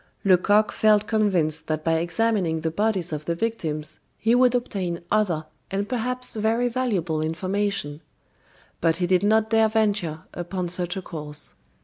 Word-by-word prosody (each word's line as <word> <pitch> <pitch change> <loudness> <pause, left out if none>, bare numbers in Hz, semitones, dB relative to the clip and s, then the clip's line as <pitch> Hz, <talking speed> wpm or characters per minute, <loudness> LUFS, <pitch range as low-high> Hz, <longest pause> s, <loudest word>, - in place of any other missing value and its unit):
Lecoq 205 +3 +4
felt 215 -1 +3
convinced 180 -8 +1
that 155 -1 -2
by 165 0 +2
examining 175 -1 0
the 160 0 -1
bodies 190 -3 0
of 150 0 -4
the 170 - -1
victims 155 -8 -3 0.2
he 225 +1 +2
would 250 0 +4
obtain 190 -8 -2
other 185 -7 +1 0.2
and 200 +1 -2
perhaps 250 +1 -2
very 225 +3 +1
valuable 195 -11 -1
information; 170 -2 -2 0.8
but 165 -1 +2
he 180 +1 0
did 180 0 +3
not 220 +2 +2
dare 225 -1 +4
venture 205 -8 0
upon 175 +1 -3
such 180 +1 -1
a 190 - -5
course. 150 -3 -5
190 Hz, 150 wpm, -24 LUFS, 165-220 Hz, 0.8 s, Lecoq